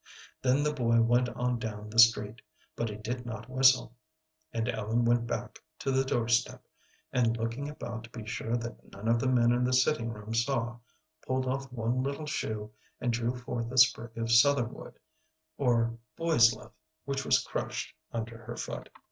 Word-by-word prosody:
Then 130 +2 +3
the 150 0 +1
boy 115 -3 +2
went 120 +2 +3
on 125 0 -1
down 105 -2 -6
the 115 - +1
street, 115 0 +5 0.3
but 115 - -2
he 105 - -6
did 120 +4 -4
not 115 -2 -7
whistle, 130 -2 +4 0.6
and 115 -5 -2
Ellen 115 +1 0
went 120 0 +2
back 120 +1 -4 0.2
to 135 - -2
the 135 0 +3
doorstep, 120 -2 0 0.5
and, 115 -2 +2
looking 115 +5 -3
about 120 -6 -6
to - - -15
be 115 -2 -8
sure 115 +2 -2
that 120 0 -8
none 100 +3 -7
of 115 0 +3
the 130 - 0
men 120 -2 +4
in 120 +1 +2
the 125 +1 +1
sitting 125 -2 +2
room 105 0 -7
saw, 120 0 0 0.5
pulled 130 0 0
off 135 +1 -3
one 120 +1 -1
little 140 +3 -3
shoe 110 -7 -3 0.3
and 120 -1 0
drew 120 +2 -1
forth 120 -1 -4
a 130 - -5
sprig 120 -3 +4
of 115 0 -1
southernwood, 125 0 +3 0.6
or 115 -3 +1 0.2
boy's 155 -8 +5
love, 110 - -10 0.3
which 135 0 -2
was - - +4
crushed - - -4 0.2
under 115 0 -5
her 120 +1 -6
foot. - - -6
120 Hz, 180 wpm, -30 LUFS, 115-130 Hz, 0.6 s, street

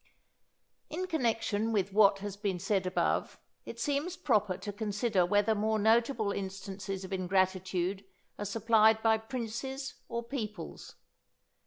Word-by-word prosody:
_ - - -41 0.9
In 355 +4 -3
connection 225 - 0
with 200 -3 0
what 200 -1 +6
has 200 -2 -4
been 200 -3 -2
said 190 +1 0
above, 185 - 0 0.3
it 230 - -8
seems 290 +8 -1
proper 210 - +1
to 205 - -6
consider 205 -2 +1
whether 205 +3 +3
more 215 +1 +1
notable 225 0 +2
instances 195 0 -5
of 190 +1 -6
ingratitude 185 0 0 0.4
are 205 - -3
supplied 220 +1 +4
by 220 -1 +4
princes 255 +3 -4 0.2
or 235 0 -3
peoples. 230 -4 -6
210 Hz, 135 wpm, -31 LUFS, 195-230 Hz, 0.9 s, what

